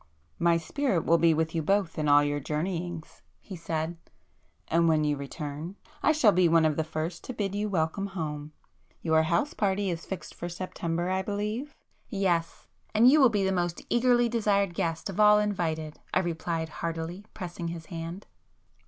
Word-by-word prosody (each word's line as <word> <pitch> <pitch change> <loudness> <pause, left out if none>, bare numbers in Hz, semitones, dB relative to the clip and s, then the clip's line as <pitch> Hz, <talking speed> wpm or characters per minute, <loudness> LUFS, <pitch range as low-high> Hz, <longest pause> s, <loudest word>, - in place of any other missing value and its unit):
"My 170 0 +4
spirit 185 - -1
will 170 +1 +4
be 165 -1 +5
with 160 0 0
you 165 - 0
both 190 0 0
in 150 - 0
all 145 0 +7
your 145 0 0
journeyings!" 165 +3 -4 0.2
he 195 - -9
said—"And 165 - -4
when 155 -1 +3
you 150 -1 +1
return, 145 +4 -6 0.3
I - - +4
shall 290 -9 +5
be 180 -2 +4
one 165 -1 +5
of 155 -1 +2
the 160 - 0
first 160 +2 -4
to 255 - -5
bid 200 -3 -2
you 210 +1 -1
welcome 180 +2 0
home. 155 -5 -5 0.5
Your 160 -1 +4
house 170 - 0
party 195 -1 0
is 165 -1 -6
fixed 190 - -6
for 175 - -6
September, 175 0 -3
I 190 0 +1
believe?" 210 +8 -3 0.3
"Yes,—and 195 +5 +1
you 305 +1 +6
will 260 - +7
be 205 -3 0
the 190 - +1
most 175 -2 -2
eagerly 240 0 +4
desired 205 -5 +1
guest 165 -1 -2
of 195 0 -6
all 210 0 +7
invited!" 165 -7 -1 0.2
I 185 - +4
replied 165 -1 -2
heartily, 170 +4 -4
pressing 175 -3 -5
his 165 -1 -6
hand. 170 +3 -6
170 Hz, 175 wpm, -28 LUFS, 160-200 Hz, 0.5 s, all